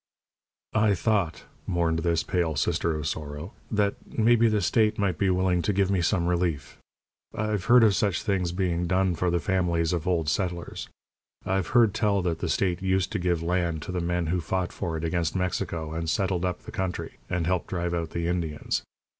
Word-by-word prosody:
"I 110 -2 +3
thought," 100 -4 0 0.2
mourned 85 -2 +1
this 85 0 +1
pale 85 -4 0
sister 80 +3 0
of 75 - -4
sorrow, 75 +3 -5 0.2
"that 105 -2 +1 0.2
maybe 115 +1 +5
the 105 -1 +2
state 110 -2 +2
might 95 -5 0
be 100 - +2
willing 90 -1 +2
to 105 - 0
give 100 -1 +1
me 95 -3 +2
some 85 0 +1
relief. 85 -4 -1 0.6
I've 105 -3 -1
heard 125 -1 +7
of 105 -3 +5
such 100 -2 0
things 95 -4 0
being 90 -1 -1
done 95 0 +2
for 90 +2 0
the 85 0 +1
families 85 -1 +1
of 85 -1 -2
old 85 -4 +1
settlers. 85 +1 -2 0.6
I've 95 -1 0
heard 115 -4 +5
tell 100 -3 +1
that 85 -2 -1
the - - -2
state 90 -2 0
used 95 -1 +1
to 105 - -1
give 85 -2 0
land 85 -3 0
to - - -5
the 90 -1 -2
men 85 0 0
who 90 - 0
fought 90 +2 -2
for 80 -2 -3
it 80 - -5
against 85 0 -1
Mexico, 90 -3 -2
and 80 0 -2
settled 95 -1 0
up 90 -1 -2
the - - -9
country, 95 -1 -4
and 90 -2 -1
helped 90 0 0
drive 85 -1 -2
out 85 -2 -2
the 85 +1 -3
Indians. 85 -4 -1
90 Hz, 195 wpm, -26 LUFS, 85-95 Hz, 0.6 s, heard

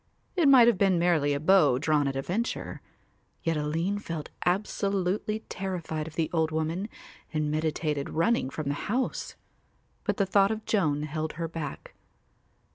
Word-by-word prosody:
It 340 -5 +4
might 255 -4 +8
have 230 -6 +3
been 195 -3 +4
merely 170 -4 +2
a - - -1
bow 155 -5 +5
drawn 150 0 +2
at 135 - -2
a 135 - -2
venture, 220 - -3 0.6
yet 165 0 +1
Aline 165 +7 -1
felt 165 -6 -6 0.2
absolutely 200 +2 0
terrified 170 -7 -4
of 160 - -10
the 160 -1 +1
old 160 -2 +2
woman 160 +6 -2 0.4
and 155 -1 -1
meditated 155 -2 -1
running 165 - +1
from 150 +1 -5
the 140 - +1 0.2
house, 255 +4 -1 0.7
but - - -1
the 200 - +2
thought 195 +1 +4
of 220 0 -3
Joan 150 -8 +1
held 155 +1 -3
her 165 +1 -3
back. 160 -3 -6
165 Hz, 160 wpm, -28 LUFS, 155-195 Hz, 0.7 s, might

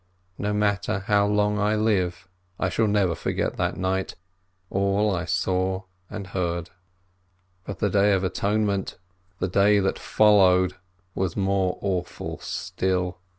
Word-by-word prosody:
No 105 - -1
matter 100 -2 0
how 100 0 +2
long 105 0 +1
I 105 +1 +2
live, 95 -6 0 0.3
I 95 - +1
shall 110 +4 +1
never 100 -4 +2
forget 80 - -2
that - - -1
night, 95 +1 -1 0.6
and 95 - -1
all 100 +1 +2
I 85 -2 -3
saw 95 +2 0 0.3
and 105 -2 -6
heard. 85 -3 -3 0.9
But 100 - -6
the 105 - 0
Day 100 +1 +4
of 95 -1 +1
Atonement, 100 +1 -1 0.4
the 95 - -1
day 100 +3 +4
that 95 -1 0
followed, 95 -4 +4 0.4
was 95 -3 -2
more 95 -2 +1
awful 90 -3 -3
still. 90 -1 -2
95 Hz, 140 wpm, -25 LUFS, 90-105 Hz, 0.9 s, Day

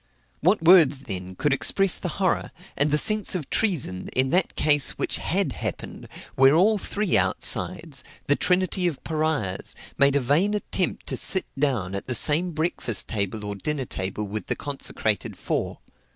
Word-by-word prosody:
What 180 +3 +2
words, 160 -6 +6
then, 95 -6 -6
could 145 +8 +1
express 195 +6 +2
the - - -5
horror, 185 -3 0 0.3
and 145 +2 +2
the 150 - +2
sense 215 +4 +1
of 155 -7 -5
treason, 150 - 0
in 130 +1 +1
that 180 +1 +1
case, 145 -2 +2
which - - -2
had - - 0
happened, - - -6 0.3
where 135 +2 +5
all 205 +5 +3
three 205 0 -1
outsides, 160 -6 +1 0.2
the 145 - +3
trinity 185 +1 +1
of 160 -6 -4
Pariahs, 155 -12 -2 0.2
made 140 0 +4
a - - +4
vain 155 +11 +1
attempt 195 -3 -2
to - - -3
sit 190 - +1
down 130 -10 -1
at 100 - -5
the 125 - -1
same 160 +9 +2
breakfast 155 - -1
table 105 0 -3
or 105 - -4
dinner 135 +6 -3
table 100 0 -4
with 105 +2 -5
the - - -1
consecrated 125 -7 -2
four? - - -3
145 Hz, 165 wpm, -24 LUFS, 120-180 Hz, 0.3 s, words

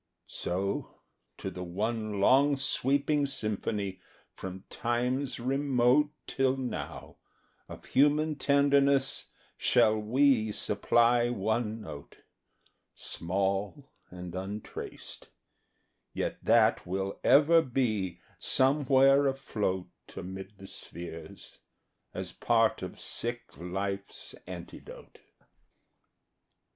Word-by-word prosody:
So, 95 +3 -3 0.4
to 95 - -5
the 90 0 -6
one 105 +3 -2
long 135 +7 +4
sweeping 140 +1 +1
symphony 105 -6 -2 0.3
From 95 0 -8
times 125 +2 -1
remote 135 +2 +2 0.2
Till 135 0 +1
now, 130 -2 -6 0.5
of - - -10
human 150 +3 +3
tenderness, 140 -1 +3 0.3
shall 110 0 +3
we 115 0 +3
Supply 120 +4 +3
one 110 0 -1
note, 70 -8 -10 0.8
Small 100 - -2 0.2
and 90 -1 -8
untraced, 95 +3 -7 0.9
yet - - -3
that - - +3
will 95 +2 -3
ever 160 +4 +6
be 115 - -1 0.2
Somewhere 135 0 +4
afloat 105 -9 -2 0.2
Amid 95 +2 -8
the 95 - -12
spheres, 85 -4 -9 0.5
as - - -5
part - - +2
of - - -7
sick 120 - -3
Life's 95 +4 -5
antidote. - - -10
115 Hz, 85 wpm, -30 LUFS, 95-135 Hz, 0.9 s, ever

